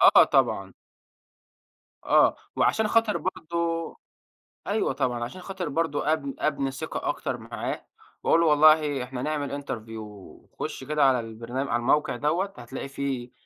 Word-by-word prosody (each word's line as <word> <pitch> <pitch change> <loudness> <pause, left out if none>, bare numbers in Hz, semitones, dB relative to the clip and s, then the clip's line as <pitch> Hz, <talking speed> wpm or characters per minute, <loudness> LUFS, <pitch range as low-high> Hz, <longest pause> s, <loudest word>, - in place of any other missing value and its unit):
آه، - - +8
طبعًا - - +1 1.3
آه، - - +5 0.2
وعشان 220 -1 +2
خاطر 225 -1 +3
برضه 170 -2 -2 0.7
أيوه - - +1
طبعًا، 120 -2 -1
عشان 185 +10 -8
خاطر 185 -3 -4
برضه 155 0 0
أب 140 -3 -2
أبني 140 -3 0
ثقة 135 - -4
أكتر - - -2
معاه، - - -5 0.4
وأقول 165 - +4
له 170 - +3
والله 150 -2 +5
إحنا 125 0 -6
نعمل 145 -1 -2
Interview 115 -4 -6 0.6
خش - - -4
كده 150 -1 +2
على 130 -2 +4
البرن 115 +2 -8
على 135 -3 0
الموقع 130 +3 +2
دَوَّة، 170 +9 0
هتلاقي 125 +3 -7
في 135 -3 -3
145 Hz, 140 wpm, -26 LUFS, 125-165 Hz, 1.3 s, آه